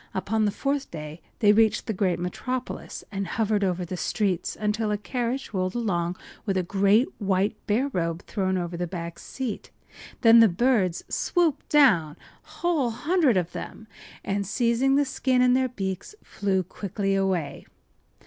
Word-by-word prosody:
Upon 215 +3 0
the 205 - +1
fourth 275 +4 -2
day 155 0 -8 0.2
they 205 -2 +6
reached 220 0 +3
the 220 - -2
great 185 -3 +1
metropolis, 250 +9 -4
and 195 -1 -3
hovered 210 +1 0
over 180 -1 0
the 185 - -5
streets 190 0 -1
until 210 +1 0
a 210 - 0
carriage 245 +3 -3
rolled 185 0 -1
along 180 -7 -1 0.3
with 195 -3 -1
a 185 - +1
great 200 +6 +3
white 195 +1 +1
bear 235 +7 +2
robe 170 -1 -2
thrown 190 -3 -1
over 175 -1 -3
the 175 +1 -2
back 170 -1 -6
seat. 255 -6 -5 0.5
Then 230 -1 +8
the 225 - +8
birds 190 -3 +1
swooped 340 -5 0
down—the 195 - +2
whole 325 -8 0
hundred 290 - +2
of 175 -1 -1
them—and 200 -1 -6
seizing 240 +5 +2
the 285 0 +3
skin 260 -1 0
in 250 0 +5
their 260 0 +2
beaks 195 - -5
flew 190 -2 -1
quickly 195 +2 -3
away. 190 -7 -1
205 Hz, 160 wpm, -26 LUFS, 185-245 Hz, 0.5 s, Then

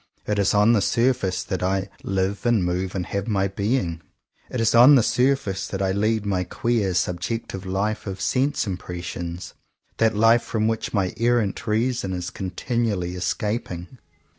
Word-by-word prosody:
It 105 -1 0
is 100 +1 +2
on 105 +3 +5
the 105 - +3
surface 115 -7 +1
that 95 - -3
I 95 +1 0
"live 95 +1 -1
and 110 -6 +3
move 90 +2 -2
and 90 -2 -2
have 100 +1 -3
my 100 -3 +1
being." 100 -4 -1 0.5
It 125 - -3
is 115 -1 +2
on 125 +5 +8
the 125 - +5
surface 125 -7 +1
that 95 - -4
I 95 -1 +1
lead 105 +2 0
my 95 -3 0
queer 105 -1 -1
subjective 90 +2 -2
life 105 +3 -2
of 95 -1 -5
sense 135 0 +1
impressions, 90 -2 -5 0.2
— - - -45
that 115 -1 +3
life 115 +2 +5
from 110 -1 -1
which 115 0 -2
my 95 -4 0
er 120 +1 +4
rant 105 -5 -2
reason 110 -2 0
is 90 -1 -4
continually 100 -1 -2
escaping. 95 +2 -3
100 Hz, 170 wpm, -23 LUFS, 95-115 Hz, 0.5 s, on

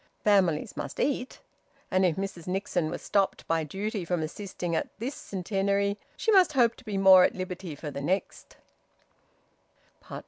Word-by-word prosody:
Families 190 -7 +2
must 140 - -6
eat. 265 -2 -1 0.5
And 185 0 +3
if 175 -4 +3
Mrs 190 -3 -5
Nixon 180 -3 -1
was - - -6
stopped 200 -1 0
by 165 -1 +1
duty 200 +6 -4
from 170 -1 -1
assisting 175 0 -4
at - - -1
this 245 +6 -4
Centenary, 200 0 -1 0.2
she 445 - +1
must 370 -6 +5
hope 240 -4 +4
to - - -15
be 210 -4 -3
more 190 -1 +8
at - - +2
liberty 185 -3 -5
for 150 +1 -7
the 140 0 -5
next. 185 +7 -3
190 Hz, 160 wpm, -28 LUFS, 170-205 Hz, 0.5 s, more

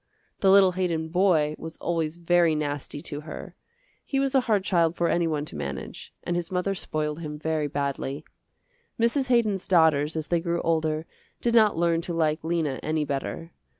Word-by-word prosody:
The 195 - +3
little 195 -1 +7
Haydon 170 -3 -1
boy 165 -4 +3
was 160 0 -8
always 165 -1 -2
very 175 -1 +3
nasty 145 0 -3
to 145 -3 -6
her. 155 0 -8 0.5
He 270 - -1
was 275 0 +1
a 270 - +5
hard 210 -5 +1
child 170 -3 +2
for 175 - +1
any 170 -1 +2
one 150 -2 -1
to - - -6
manage, 70 -2 -6
and 175 - -2
his 175 0 -3
mother 185 +2 0
spoiled 155 -4 -3
him 150 -2 -6
very 155 -1 -1
badly. 140 0 -3 0.7
Mrs. 245 +4 +2
Haydon's 220 -6 +2
daughters 160 -4 +3
as 160 -1 -3
they 175 - +2
grew 170 0 -1
older 160 -1 0 0.3
did 235 - 0
not 215 -6 +5
learn 170 -1 +2
to 170 0 -4
like 155 -1 +1
Lena 160 -5 -1
any 155 -1 -1
better. 145 +4 -4
165 Hz, 185 wpm, -26 LUFS, 155-180 Hz, 0.7 s, little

